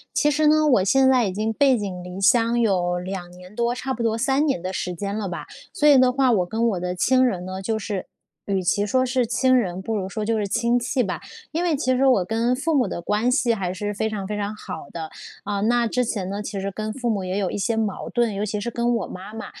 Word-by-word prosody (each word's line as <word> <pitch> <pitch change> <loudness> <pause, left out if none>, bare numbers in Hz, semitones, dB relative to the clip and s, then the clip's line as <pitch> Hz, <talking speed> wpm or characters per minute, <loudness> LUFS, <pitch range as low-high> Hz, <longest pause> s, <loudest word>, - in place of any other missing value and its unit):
其 295 - +3
实 305 +1 +2
呢， 310 0 +4
我 245 -10 +4
现 265 +7 +4
在 255 -4 +4
已 190 - -2
经 215 +3 -1
背 265 +2 +3
井 190 -4 -5
离 180 +2 -7
乡 230 +3 +4
有 180 -5 +1
2 180 -1 -6
年 180 +2 -14
多， 235 +1 0
差 260 +1 -3
不 240 - -4
多 225 -1 0
3 270 +4 +2
年 275 - 0
的 185 +2 -4
时 180 -1 -3
间 200 +3 -4
了 210 -3 -3
吧。 175 - -6 0.3
所 300 -6 +3
以 290 - +8
的 255 0 +5
话， 260 -1 +3
我 185 -5 +2
跟 225 +6 0
我 185 -4 -2
的 180 0 -2
亲 255 +8 +3
人 190 -8 0
呢， 185 +1 -6
就 220 +3 -1
是 205 -3 -4 0.4
与 195 -2 0
其 205 +3 +1
说 255 +5 +2
是 255 -1 +1
亲 255 +2 +3
人， 185 -7 0
不 225 - -3
如 190 -3 -2
说 215 +2 -4
就 225 +1 0
是 205 -1 -1
亲 235 +3 +2
戚 250 +2 0
吧。 180 -7 -3 0.3
因 330 +2 -1
为 340 -4 +1
其 255 -2 +1
实 270 +2 +3
我 250 -9 +4
跟 230 +5 0
父 320 +5 -1
母 260 -4 +2
的 - - -4
关 210 +7 +1
系 250 -2 +2
还 185 -4 -3
是 205 +2 -3
非 220 +2 -1
常 205 -3 -4
非 210 +1 -3
常 205 +1 -3
好 - - -8
的。 160 -2 -6 0.3
啊， 200 0 -2
那 235 +2 +2
之 250 +3 0
前 200 -5 -3
呢， 200 +1 -3
其 205 -1 -5
实 195 +1 -3
跟 215 +2 -4
父 245 0 -2
母 200 -3 -1
也 185 +1 -2
有 195 -3 0
一 - - -4
些 215 +3 0
矛 215 -3 -2
盾， 235 -4 0
尤 200 - -2
其 210 0 -2
是 235 +3 -3
跟 240 +1 0
我 230 - -2
妈 195 +4 -9
妈， 225 - -6
220 Hz, 285 characters per minute, -23 LUFS, 195-250 Hz, 0.4 s, 以